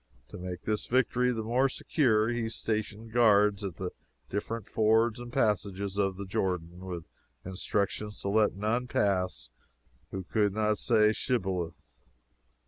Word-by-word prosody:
To - - -9
make 90 0 -6
his 105 -1 -1
victory 125 0 +2
the 115 -2 -2
more 125 +5 +2
secure, 115 -5 +2
he 120 -2 -1
stationed 110 0 -3
guards 105 -3 +4
at 95 -4 -4
the 90 0 -4 0.4
different 105 +2 -3
fords 110 +2 +2
and 120 0 -8
passages 100 -6 0
of 95 -2 0
the 100 - -5
Jordan, 90 -2 -2
with 85 -3 -5 0.4
instructions 100 +2 -2
to 100 - -2
let 105 0 +3
none 110 +5 0
pass 90 - 0 0.6
who 95 -1 -5
could 105 +1 +1
not 105 -1 +1
say 110 -2 +4
Shibboleth. 95 -9 -1
105 Hz, 140 wpm, -30 LUFS, 95-115 Hz, 0.6 s, guards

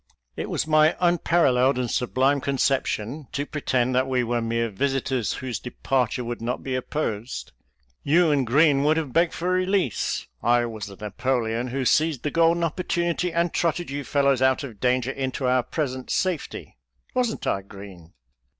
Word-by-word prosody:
It - - -4
was - - -1
my 155 +1 +4
unpar 175 -1 +3
alleled 130 +1 +3
and 125 -2 -1
sublime 130 +3 +1
conception 135 -1 -1
to 145 -1 -2
pretend 130 -4 0
that 130 +1 +2
we 130 -2 +1
were 120 0 -1
mere 115 0 -1
visitors 135 +1 -1
whose 130 -2 -4
departure 125 -1 -1
would 120 0 -5
not 120 +2 -3
be 130 - -3
opposed. 130 -3 -3 0.5
You 165 +2 +3
and 140 -4 +1
Green 140 +2 +4
would 155 +2 +3
have 150 -6 -3
begged 170 0 +3
for 180 +2 -1
release 185 - 0
— - - -43 0.2
I 120 - +1
was 110 -3 -6
the 100 - -10
Napoleon 115 +3 -2
who 130 +1 -2
seized 155 -1 +2
the 150 - -1
golden 170 +2 +3
opportunity 170 +1 -1
and 170 0 0
trotted 170 -2 -1
you 140 +1 -3
fellows 140 -1 +2
out 130 +2 +3
of 115 -7 -8
danger 125 0 +1
into 130 -1 -3
our 125 0 +3
present 130 -1 -4
safety 175 - -2 0.2
— - - -38
wasn't 245 -3 -1
I, 100 - 0
Green?" 95 -4 -12
135 Hz, 175 wpm, -24 LUFS, 120-155 Hz, 0.5 s, my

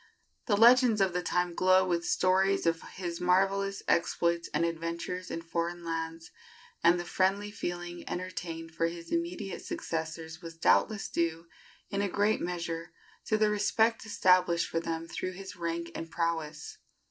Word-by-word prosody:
The 205 -4 +3
legends 240 0 +6
of 190 -2 +2
the 180 - 0
time 180 0 0
glow 185 +1 +4
with 170 -1 0
stories 190 +1 +2
of 165 0 +1
his 175 -2 -4
marvellous 195 +2 +2
exploits 170 0 +1
and 170 - +1
adventures 170 +2 -4
in 165 - -4
foreign 170 +1 -3
lands, 165 0 -4 0.5
and 175 +1 +5
the 175 - -4
friendly 195 +3 +1
feeling 175 -3 -5
entertained 165 -3 -5
for 165 0 +1
his 170 0 -8
immediate 335 - -3
successors 160 +1 -4
was 165 -1 -9
doubtless 210 +5 +3
due 165 0 -1 0.5
in 200 - 0
a 200 - 0
great 205 +3 +1
measure 170 -2 -4 0.3
to 215 - +2
the 215 -1 +3
respect 220 +2 +2
established 180 -5 +3
for 165 - -1
them 165 0 -4
through 185 +2 -4
his 190 +1 -8
rank 170 -1 -3
and 165 - -6
prowess. 160 -2 -3
175 Hz, 155 wpm, -30 LUFS, 165-195 Hz, 0.5 s, legends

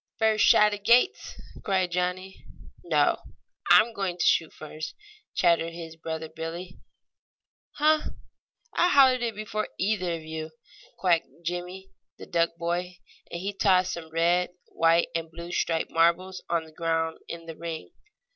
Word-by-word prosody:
"First 220 -2 +3
shot 210 0 +6
agates!" 235 - +2 0.2
cried 185 -3 0
Johnnie. 180 +2 -3 0.4
"No, - - +2 0.5
I'm 225 +2 +6
going 195 -4 -3
to - - 0
shoot 160 -2 +3
first!" 155 +1 -8 0.4
chattered 170 -1 +2
his 165 -1 -8
brother 160 0 -5
Billie. 165 +3 -7 0.9
"Huh! 305 +1 +2 0.6
I 355 - +3
hollered 265 -5 +5
it 230 -3 -2
before 215 0 -3
either 185 -3 0
of 165 - -8
you," 160 0 -6 0.5
quacked 175 -3 +2 0.2
Jimmie, 180 +3 -5 0.3
the - - -10
duck 170 -1 0
boy, 175 +1 -3 0.3
and 170 - -5
he 200 +2 -3
tossed 185 -2 +3
some 165 -2 -7
red, 170 +2 +2 0.2
white 165 +1 +3
and 165 -1 -3
blue 170 +2 -9
striped 165 -2 -1
marbles 170 +3 +2
on 170 -1 +1
the 160 - -15
ground 165 0 -1
in 165 0 -7
the 165 -1 -8
ring. 165 - -6
175 Hz, 145 wpm, -27 LUFS, 165-195 Hz, 0.9 s, shot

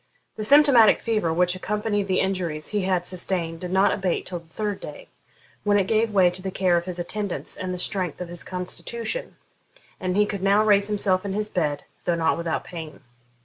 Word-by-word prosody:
The - - -6
symptomatic 260 -2 +6
fever 215 -8 0
which 180 +2 +2
accompanied 205 +1 -2
the 185 - +2
injuries 175 -5 -1
he 210 -1 0
had 185 -2 0
sustained 175 -2 -2
did 180 - -5
not 190 +1 +4
abate 190 -3 -1
till 180 -2 -3
the 165 - -21
third 205 +3 -3
day, - - -9 0.5
when 205 -1 +3
it 195 - +2
gave 220 +3 +2
way 190 -4 +4
to 180 +1 -5
the 190 - -3
care 185 -1 +2
of 170 0 0
his 180 -1 -5
attendants 200 +2 -3
and 185 0 -4
the 180 - -3
strength 180 -3 -1
of 180 - -5
his 175 0 -6
constitution, 230 - -4 0.6
and 185 +1 -1
he 210 - +5
could 200 -2 -4
now 200 +2 +4
raise 200 -1 +4
himself 195 -3 +1
in 200 -1 -3
his 210 +1 -2
bed, 150 -5 -1 0.2
though 175 - +2
not 160 -1 +1
without 170 -1 -2
pain. 160 -3 -9
185 Hz, 205 wpm, -24 LUFS, 175-210 Hz, 0.6 s, symptomatic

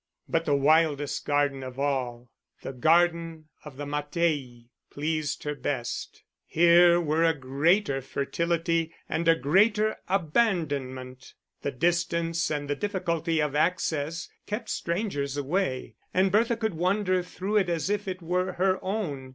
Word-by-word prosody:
But 165 0 0
the 145 - +2
wildest 145 0 +2
garden 145 -2 +1
of 130 -1 -8
all, 125 -4 -2 0.3
the 135 - -5
garden 165 +2 +2
of 150 -4 -11
the 145 - -5
Mattei, 145 -5 -2 0.2
pleased 155 0 -2
her 150 - -2
best. 135 -4 -4 0.2
Here 170 +1 +6
were 160 -1 +1
a 165 -1 +3
greater 140 +3 +1
fertility 165 +4 -1
and 165 +1 -2
a 165 - +6
greater 210 +8 +2
abandonment; 145 - -1 0.3
the - - -1
distance 170 +3 0
and 145 -1 -2
the 145 - -1
difficulty 170 -3 -1
of 150 -2 -2
access 160 0 0 0.2
kept 215 +2 -4
strangers 170 -7 -2
away, 140 - -1 0.2
and 190 +1 +3
Bertha 225 +3 +2
could 220 -3 -1
wander 185 +2 +1
through 190 +4 -2
it 190 -4 +2
as 170 -1 -1
if 205 0 -1
it 185 -2 -5
were 180 +2 -1
her 185 +1 +1
own. 170 -10 -3
165 Hz, 140 wpm, -27 LUFS, 145-180 Hz, 0.3 s, Here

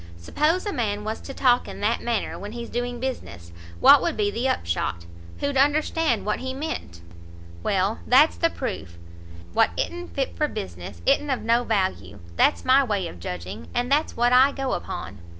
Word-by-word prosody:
Suppose 305 - 0
a 410 - -2
man 210 -3 -1
was 220 +1 -4
to - - -8
talk 250 -2 +2
in - - -8
that 225 +3 +1
manner 235 -2 -2
when 205 +2 -7
he's 235 -1 -7
doing 245 0 -3
business, 90 - -5 0.3
what - - +8
would - - -1
be 205 -1 +1
the 240 +5 -1
upshot? 85 - -2 0.4
who'd 285 -1 0
understand 295 -2 +2
what 210 - -1
he 260 0 -4
meant? 270 - -5 0.6
Well, 195 - 0
that's 280 +5 +6
the 335 - +2
proof; 95 - -5 0.6
what - - +4
i'n't 350 0 -4
fit 270 -1 -2
for 300 - +1
business, 85 - -7
i'n't 295 - +3
of 265 - -1
no 235 +2 +3
value; 190 - -1 0.2
that's - - +2
my 265 +2 +5
way 205 -7 -1
of 90 - -10
judging, 90 +5 -6
and 245 +2 -1
that's 295 +3 +1
what 240 +1 +3
I 260 +3 +6
go 270 -2 -2
upon." - - -5
240 Hz, 185 wpm, -24 LUFS, 185-270 Hz, 0.6 s, what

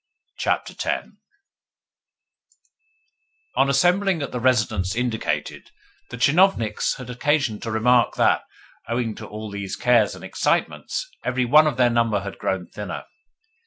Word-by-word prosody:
CHAPTER - - -1
X - - -2 2.5
On 135 +1 +3
assembling 180 +4 +2
at 140 - -5
the 125 - -3
residence 110 -6 +1
indicated, 120 -2 -2 0.4
the 125 - -7
tchinovniks 140 - +2
had 125 -1 -8
occasion 125 -3 0
to 115 - -5
remark 120 +2 +3
that, - - +3 0.5
owing 115 -1 -1
to 110 0 -9
all 105 0 -7
these 100 -1 -5
cares 120 -2 +3
and - - -12
excitements, - - -1 0.2
every 130 0 0
one 150 +5 +6
of 150 - -1
their 125 -1 +4
number 115 -3 +1
had 100 -1 -7
grown 95 -2 -2
thinner. 105 +3 -7
120 Hz, 130 wpm, -23 LUFS, 110-135 Hz, 2.5 s, one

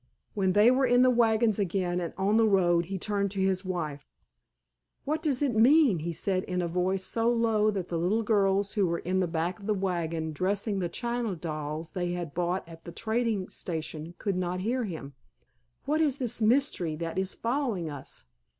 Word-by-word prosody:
When 190 -3 +1
they 210 +5 +6
were 260 +1 +3
in 245 +1 +5
the 255 - +5
wagons 225 -2 +3
again 180 -2 0
and 170 - -3
on 200 +3 +2
the 225 -1 +4
road 175 -4 +3
he 190 +3 -4
turned 200 +1 -1
to 195 0 -4
his 190 0 +1
wife. 160 -6 -4 1.0
"What 310 +3 -1
does 290 -4 0
it 270 -4 +1
mean?" 250 - +5
he 170 +3 -3
said 185 +3 -1
in 180 -1 -2
a 175 - 0
voice 180 +2 0
so 230 +4 +1
low 225 -2 +2
that 195 -4 -3
the 170 - -1
little 205 +7 +1
girls 200 -2 +2
who 200 -3 +2
were 170 0 0
in 185 +2 -1
the 185 - +1
back 170 +2 -2
of 200 - -9
the 215 - +2
wagon 165 -4 -2
dressing 200 +5 -1
the 175 -2 -1
china 235 +1 -2
dolls 155 -1 -5
they 175 -2 -2
had 175 -4 -5
bought 175 +1 -1
at 165 -1 -12
the 170 - -8
trading 220 -1 -1
station 160 0 -5
could 200 -3 -2
not 180 0 -2
hear 240 +4 0
him. 155 -7 -7 0.7
"What 305 +2 +1
is 290 -4 +2
this 245 -3 -1
mystery 220 - +2
that 165 +3 -3
is 190 0 -1
following 230 - -1
us? 145 - -7
190 Hz, 200 wpm, -28 LUFS, 175-225 Hz, 1.0 s, they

